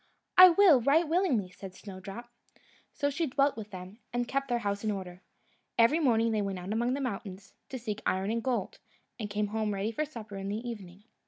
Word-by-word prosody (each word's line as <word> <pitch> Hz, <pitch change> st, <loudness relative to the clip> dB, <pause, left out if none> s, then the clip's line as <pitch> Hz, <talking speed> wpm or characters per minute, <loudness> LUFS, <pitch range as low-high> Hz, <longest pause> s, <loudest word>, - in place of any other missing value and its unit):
"I 370 Hz, 0 st, +11 dB
will, 340 Hz, -7 st, +6 dB
right 305 Hz, +7 st, +3 dB
willingly," 300 Hz, -, +1 dB
said 190 Hz, 0 st, -10 dB
Snowdrop. 195 Hz, +4 st, -9 dB, 0.6 s
So 285 Hz, 0 st, -1 dB
she 320 Hz, +3 st, -1 dB
dwelt 275 Hz, +2 st, +2 dB
with 215 Hz, -2 st, -7 dB
them, 185 Hz, +3 st, -9 dB
and 245 Hz, 0 st, -1 dB
kept 275 Hz, +2 st, -1 dB
their 240 Hz, -2 st, +1 dB
house 200 Hz, +1 st, -1 dB
in 215 Hz, -, 0 dB
order. 185 Hz, -3 st, -5 dB, 0.6 s
Every 235 Hz, +8 st, +5 dB
morning 230 Hz, -6 st, +3 dB
they 215 Hz, -1 st, +1 dB
went 195 Hz, -2 st, -3 dB
out 180 Hz, +3 st, -4 dB
among 240 Hz, +3 st, +1 dB
the 280 Hz, -, -3 dB
mountains, 195 Hz, -5 st, -5 dB, 0.2 s
to 260 Hz, -, -5 dB
seek 220 Hz, -3 st, -5 dB
iron 190 Hz, +3 st, 0 dB
and 230 Hz, 0 st, -1 dB
gold, 260 Hz, -, -2 dB, 0.4 s
and 210 Hz, -2 st, -4 dB
came 210 Hz, 0 st, -1 dB
home 215 Hz, -1 st, -1 dB
ready 200 Hz, +3 st, -1 dB
for 265 Hz, +7 st, -1 dB
supper 220 Hz, -9 st, -8 dB
in 195 Hz, 0 st, -4 dB
the 220 Hz, +4 st, -4 dB
evening. 200 Hz, -4 st, -8 dB
220 Hz, 210 wpm, -30 LUFS, 200-265 Hz, 0.6 s, I